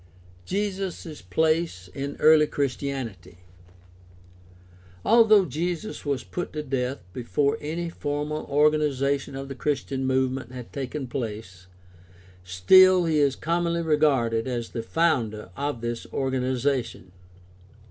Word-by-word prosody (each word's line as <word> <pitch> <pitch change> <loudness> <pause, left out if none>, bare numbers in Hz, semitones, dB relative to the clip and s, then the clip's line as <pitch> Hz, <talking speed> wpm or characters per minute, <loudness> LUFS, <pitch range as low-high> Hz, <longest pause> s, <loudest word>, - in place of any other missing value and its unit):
Jesus' 190 - -3
place 155 - 0
in 140 +8 -5
early 155 -1 +6
Christianity. 130 - -4 0.9
— 90 0 -25
^Although 215 -4 +6
Jesus 175 - -3
was 140 -4 -2
put 175 - -5
to 150 -1 -3
death 130 -4 -2
before 140 +5 0
any 165 +3 -3
formal 150 -1 -3
organization 140 -2 +1
of 135 0 -6
the 135 - -6
Christian 135 -1 -2
movement 130 -1 -1
had 125 -2 -9
taken 135 +1 -4
place, 105 -7 -6 0.8
still 180 - +6
he 160 -2 +2
is 140 -2 +3
commonly 170 +1 -1
regarded 135 -7 +2
as 120 -2 -3
the 115 - -4
founder 115 - 0
of 140 -3 -3
this 120 0 -4
organization. 130 -6 -1
135 Hz, 115 wpm, -25 LUFS, 115-155 Hz, 0.9 s, early